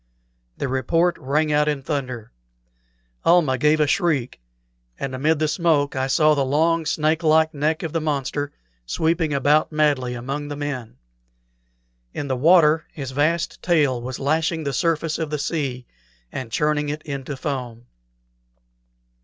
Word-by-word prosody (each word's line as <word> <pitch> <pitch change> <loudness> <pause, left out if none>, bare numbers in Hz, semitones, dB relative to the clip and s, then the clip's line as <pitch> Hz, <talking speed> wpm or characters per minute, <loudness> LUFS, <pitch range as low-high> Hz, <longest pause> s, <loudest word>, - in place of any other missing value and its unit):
The - - -2
report 165 +7 +1
rang 150 +4 0
out 150 0 +3
in 145 -3 -1
thunder. 130 -6 -4 0.9
Almah 155 -7 +3
gave 150 +2 +3
a 150 - +4
shriek, 145 - 0 0.6
and 135 -1 -4
amid 150 +5 +1
the 155 +1 +1
smoke 150 -3 +1
I 130 0 0
saw 155 +3 +4
the 140 -2 +1
long, 160 +4 +1
snake 155 0 +1
like 160 0 +3
neck 155 +3 -1
of 160 - -4
the 165 - 0
monster 145 -1 -2 0.4
sweeping 160 - 0
about 145 +3 +2
madly 145 -5 +1
among 135 +5 -4
the 145 - -5
men. 140 - -5 1.2
In 145 - -3
the 130 - 0
water 155 +2 +4
his 135 -3 -6
vast 155 +5 0
tail 145 -8 +2
was 125 +1 -5
lashing 160 +3 0
the 140 -2 -2
surface 165 +1 0
of 160 -2 -2
the 150 - -2
sea, 140 -5 -3 0.5
and 125 -4 -6
churning 150 +2 0
it 150 +1 -4
into 140 -1 -5
foam. 125 -4 -5
150 Hz, 150 wpm, -22 LUFS, 135-160 Hz, 1.2 s, a